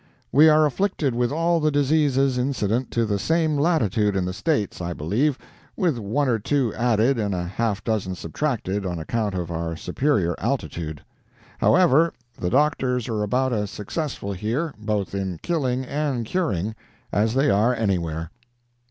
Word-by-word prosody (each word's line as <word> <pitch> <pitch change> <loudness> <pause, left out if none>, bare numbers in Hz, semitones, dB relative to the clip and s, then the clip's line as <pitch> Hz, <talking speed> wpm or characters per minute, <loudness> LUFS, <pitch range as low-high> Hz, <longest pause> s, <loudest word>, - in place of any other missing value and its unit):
We 155 +3 +7
are 155 0 +5
afflicted 150 -3 0
with 120 +1 0
all 165 +2 +2
the 155 -1 +2
diseases 140 -2 +2
incident 125 -2 0
to 115 -1 0
the 100 -2 -1
same 160 - +1
latitude 115 - +2
in 95 -2 0
the 90 - -3
States, 105 - -1
I 85 0 -3
believe, 115 - 0 0.4
with 170 - +1
one 115 +8 0
or 115 -3 +1
two 125 0 0
added 120 +2 +2
and 100 -3 -1
half 100 +4 -2
a - - -42
dozen 100 -5 -1
subtracted 100 - -2
on 90 -2 -3
account 105 +4 -2
of 85 -2 -3
our 85 0 -3
superior 90 - 0
altitude. 80 -3 -3 0.6
However, 170 -2 +4 0.2
the 90 - -2
doctors 130 -2 +1
are 110 -2 -1
about 125 +5 +1
as 105 -2 -1
successful 105 - -4
here, 120 - -2
both 105 -3 -2
in 95 -3 -3
killing 130 -6 0
and 140 -4 -2
curing, 110 - -1 0.4
as 110 +4 +1
they 135 +2 +3
are 110 +5 +3
anywhere. 85 -7 -1
115 Hz, 160 wpm, -23 LUFS, 100-145 Hz, 0.6 s, We